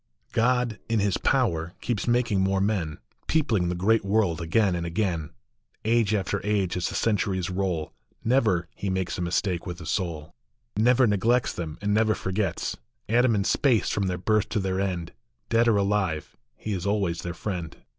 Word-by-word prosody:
OD, 125 Hz, -1 st, +2 dB
in 115 Hz, -1 st, +2 dB
his 100 Hz, -2 st, +1 dB
power, 85 Hz, -10 st, +1 dB
keeps 115 Hz, -3 st, -2 dB
making 120 Hz, -5 st, +2 dB
more 95 Hz, 0 st, +2 dB
men, 95 Hz, -6 st, 0 dB, 0.3 s
Peopling 115 Hz, -, +1 dB
the 90 Hz, -, -1 dB
great 105 Hz, +6 st, +2 dB
world 100 Hz, -5 st, +1 dB
again 95 Hz, +4 st, +2 dB
and 85 Hz, -, -2 dB
again; 85 Hz, -2 st, -1 dB, 0.6 s
Age 110 Hz, -2 st, +3 dB
after 100 Hz, 0 st, -1 dB
age, 100 Hz, -4 st, 0 dB
as 90 Hz, -1 st, -1 dB
the -, -, -6 dB
centuries 95 Hz, -4 st, 0 dB
roll, 90 Hz, -4 st, -2 dB, 0.3 s
Never 110 Hz, -9 st, +2 dB
he 100 Hz, -, -4 dB
makes 95 Hz, -1 st, -2 dB
a -, -, -2 dB
mistake 90 Hz, +1 st, -1 dB
with 90 Hz, 0 st, -5 dB
a 85 Hz, -, -9 dB
soul, 80 Hz, -2 st, -3 dB, 0.4 s
Never 125 Hz, +4 st, +4 dB
neglects 115 Hz, +4 st, +2 dB
them, 80 Hz, -3 st, -5 dB
and 105 Hz, 0 st, +1 dB
never 110 Hz, 0 st, +3 dB
forgets. 95 Hz, -1 st, -2 dB, 0.3 s
Atoms 120 Hz, +1 st, +3 dB
in 100 Hz, -, +1 dB
space 120 Hz, +2 st, +2 dB
from 100 Hz, -2 st, 0 dB
their 90 Hz, -1 st, -1 dB
birth 105 Hz, +2 st, +1 dB
to 110 Hz, -, 0 dB
their 95 Hz, -1 st, -1 dB
end, 90 Hz, -3 st, -2 dB, 0.4 s
Dead 115 Hz, +1 st, +3 dB
or 110 Hz, -3 st, +4 dB
alive, 100 Hz, -6 st, 0 dB, 0.2 s
he 110 Hz, -, -4 dB
is 90 Hz, -1 st, -3 dB
always 100 Hz, -5 st, 0 dB
their 85 Hz, 0 st, -5 dB
friend. 90 Hz, -5 st, -4 dB
100 Hz, 175 wpm, -26 LUFS, 90-110 Hz, 0.6 s, Never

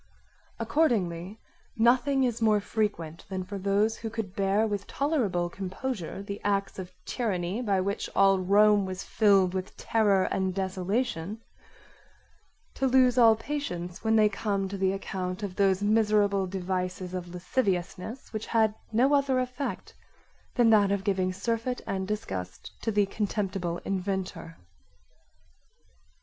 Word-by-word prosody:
Accordingly 200 Hz, -, 0 dB, 0.4 s
nothing 255 Hz, +4 st, +3 dB
is 235 Hz, -2 st, -1 dB
more 215 Hz, -2 st, +4 dB
frequent 200 Hz, -7 st, -3 dB
than 190 Hz, -1 st, -3 dB
for 195 Hz, +2 st, -6 dB
those 200 Hz, +3 st, +1 dB
who 225 Hz, -, -5 dB
could 215 Hz, -4 st, -5 dB
bear 200 Hz, +2 st, +2 dB
with 205 Hz, -2 st, -3 dB
tolerable 240 Hz, -, 0 dB
composure 190 Hz, +1 st, -5 dB
the 200 Hz, 0 st, -6 dB
acts 200 Hz, -1 st, -1 dB
of 185 Hz, -1 st, -7 dB
tyranny 200 Hz, -3 st, -2 dB
by 200 Hz, -5 st, +1 dB
which 200 Hz, +2 st, -2 dB
all 195 Hz, -1 st, +5 dB
Rome 205 Hz, +1 st, +4 dB
was 185 Hz, 0 st, -5 dB
filled 195 Hz, -4 st, +3 dB
with 185 Hz, 0 st, -5 dB
terror 205 Hz, -4 st, +2 dB
and 190 Hz, -1 st, -1 dB
desolation 195 Hz, +1 st, -2 dB, 1.3 s
to 270 Hz, -, 0 dB
lose 255 Hz, -1 st, +4 dB
all 225 Hz, -2 st, +7 dB
patience 215 Hz, -10 st, -5 dB
when 220 Hz, 0 st, +3 dB
they 215 Hz, -1 st, +6 dB
come 200 Hz, -1 st, -1 dB
to 200 Hz, -, -5 dB
the 190 Hz, 0 st, +2 dB
account 190 Hz, 0 st, -4 dB
of 190 Hz, -3 st, -4 dB
those 195 Hz, -1 st, +2 dB
miserable 205 Hz, -2 st, +3 dB
devices 185 Hz, -1 st, -3 dB
of 180 Hz, -1 st, -4 dB
lasciviousness 185 Hz, +4 st, -2 dB
which 215 Hz, 0 st, -4 dB
had 220 Hz, -2 st, +2 dB, 0.2 s
no 250 Hz, +6 st, +3 dB
other 275 Hz, -2 st, +3 dB
effect 255 Hz, +2 st, -4 dB, 0.6 s
than 235 Hz, -2 st, +5 dB
that 205 Hz, -2 st, +5 dB
of 200 Hz, -1 st, 0 dB
giving 190 Hz, -2 st, +1 dB
surfeit 230 Hz, +6 st, -2 dB
and 190 Hz, -1 st, -3 dB
disgust 95 Hz, -, -5 dB
to 225 Hz, -, -1 dB
the 205 Hz, -1 st, +3 dB
contemptible 195 Hz, -4 st, -2 dB
inventor. 185 Hz, -3 st, -3 dB
200 Hz, 135 wpm, -28 LUFS, 185-225 Hz, 1.3 s, all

